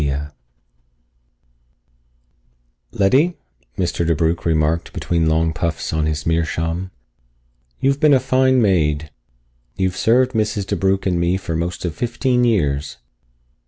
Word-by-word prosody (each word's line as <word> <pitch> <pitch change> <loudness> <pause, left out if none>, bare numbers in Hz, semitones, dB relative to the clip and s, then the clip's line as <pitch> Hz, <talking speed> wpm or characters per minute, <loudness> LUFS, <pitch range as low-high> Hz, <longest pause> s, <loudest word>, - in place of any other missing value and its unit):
+] - - +2 2.9
"Letty," 140 - +2 0.4
Mr. 85 -2 -1
DeBrugh 85 0 0
remarked 80 0 0
between 85 -2 0
long 80 0 +1
puffs 80 0 -3
on 80 -1 0
his 75 -1 -3
meerschaum, 80 +2 -1 0.9
"you've 135 +1 +1
been 150 -2 +5
a - - +4
fine 130 0 +2
maid. 75 -6 +1 0.6
You've 95 -1 -1
served 125 +5 +3
Mrs. 105 -3 -1
DeBrugh 95 0 0
and 90 -2 +1
me 85 +2 +1
for 90 -3 -4
most 85 +2 -3
of 85 - -2
fifteen 125 - 0
years. 75 -11 0
85 Hz, 120 wpm, -19 LUFS, 80-115 Hz, 2.9 s, been